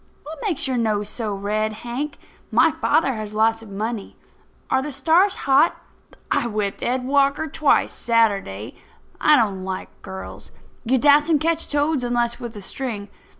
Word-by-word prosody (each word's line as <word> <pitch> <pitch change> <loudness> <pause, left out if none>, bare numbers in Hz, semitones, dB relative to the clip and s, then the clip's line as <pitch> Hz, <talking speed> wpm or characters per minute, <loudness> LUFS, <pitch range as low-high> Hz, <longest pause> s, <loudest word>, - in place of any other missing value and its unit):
What 310 0 -9
makes 335 -9 0
your 260 -2 -1
nose 210 -3 0
so 220 -2 -4
red, 210 +2 -1
Hank? 275 +5 -4 0.3
My - - +5
father 275 -4 +1
has 215 -2 -6
lots 225 +1 +2
of 225 - -12
money. 210 +1 -4 0.6
Are 265 - +3
the 295 +2 -5
stars 330 +9 +3
hot? 275 +4 +4 0.6
I - - +1
whipped 210 -3 -2
Ed 250 +1 -1
Walker 280 +3 +2
twice, 305 -1 +2
Saturday. 200 - 0 0.5
I 305 - +6
don't 200 -7 +1
like 190 0 -5
girls. 190 0 -8 0.4
You 260 +3 +3
dassent 295 +3 +4
catch 330 0 0
toads 290 -2 +1
unless 240 0 0
with 240 -3 -7
a 205 - -7
string. 215 -4 -5
240 Hz, 155 wpm, -22 LUFS, 215-285 Hz, 0.6 s, I